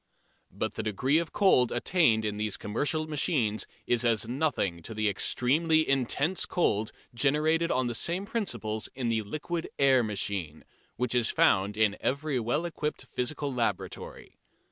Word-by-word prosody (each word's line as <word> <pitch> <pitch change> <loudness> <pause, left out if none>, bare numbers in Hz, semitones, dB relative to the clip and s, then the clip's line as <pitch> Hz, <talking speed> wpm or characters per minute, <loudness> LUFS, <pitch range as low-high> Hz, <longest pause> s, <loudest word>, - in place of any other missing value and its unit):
But - - -3
the - - -4
degree 130 +9 +1
of 170 - -4
cold 155 - +4
attained 120 -4 +2
in 105 -1 -2
these 105 -1 -2
commercial 145 +9 -1
machines 140 - 0 0.2
is 120 -1 +1
as 115 -2 +2
nothing 125 - -1
to 110 +7 -8
the 110 0 0
extremely 155 - +2
intense 135 +6 +1
cold 110 - 0 0.2
generated 155 +6 +2
on 130 -3 +1
the 120 - -2
same 175 - 0
principles 120 - -3
in 125 -3 -2
the 110 -1 +1
liquid 155 +10 -4
air 135 -2 +5
machine, 100 -7 -3 0.3
which 125 0 -1
is 120 -2 +2
found 100 +2 +2
in 105 -2 +2
every 140 0 -1
well 120 +9 -1
equipped 150 -3 -4
physical 140 +2 -3
laboratory. 120 -2 -4
125 Hz, 150 wpm, -28 LUFS, 110-155 Hz, 0.3 s, air